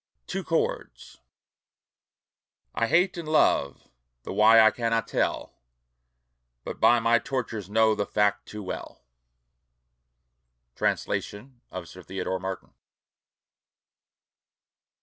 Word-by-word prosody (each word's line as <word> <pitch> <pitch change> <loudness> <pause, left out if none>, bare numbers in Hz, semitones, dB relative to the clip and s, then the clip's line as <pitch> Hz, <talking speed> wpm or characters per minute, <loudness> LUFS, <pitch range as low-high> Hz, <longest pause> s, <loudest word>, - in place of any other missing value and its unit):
TWO - - -4
CHORDS - - -3 1.5
I 115 - 0
Hate 180 +6 +2
and 170 -2 -6
love 70 - +2 0.4
the - - -6
why 110 +3 +6
I 110 0 +7
cannot 115 -1 -1
tell. - - -2 1.1
But - - -7
by 120 - +5
my 115 +1 +3
tortures 115 -6 -4
know 110 +1 +3
the 105 -2 -2
fact 105 0 0
too 105 0 -8
well. 95 - -7 1.7
Translation 120 +4 -3
of 90 -2 -7
Sir 90 - -12
Theodore 95 0 -4
Martin. 95 -2 -6
110 Hz, 100 wpm, -26 LUFS, 95-120 Hz, 1.7 s, I